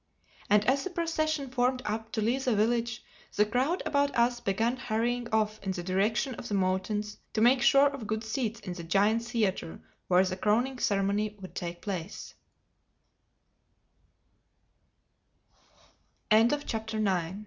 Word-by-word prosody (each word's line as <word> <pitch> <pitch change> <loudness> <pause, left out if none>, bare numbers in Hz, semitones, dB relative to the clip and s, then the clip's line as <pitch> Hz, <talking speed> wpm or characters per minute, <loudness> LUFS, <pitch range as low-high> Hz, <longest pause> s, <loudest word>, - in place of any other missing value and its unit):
And 210 0 +4
as 270 +2 +2
the 375 - -3
procession 310 -5 -1
formed 255 0 +1
up 220 +1 -3
to 220 - -1
leave 250 +5 0
the 245 -4 +2
village, 235 +2 0 0.3
the 210 - +4
crowd 255 - 0
about 285 -2 +1
us 240 +1 +2
began 225 +4 0
hurrying 240 0 -1
off 215 -1 +1
in 190 -1 -2
the 175 -2 -5
direction 210 +8 0
of 235 - -8
the 205 - -2
mountains 195 +3 -1
to 220 - 0
make 250 +2 +5
sure 275 +3 +6
of 275 -6 -2
good 220 +1 -2
seats 220 -1 -2
in 180 - -5
the 175 -1 -7
giant 205 +6 +2
theatre 220 -8 -2 0.3
where 180 +1 +5
the 185 0 -3
crowning 240 +6 +1
ceremony 205 +1 0
would 185 -1 -10
take 175 0 -6
place. 190 -2 -5
220 Hz, 135 wpm, -29 LUFS, 200-250 Hz, 0.3 s, sure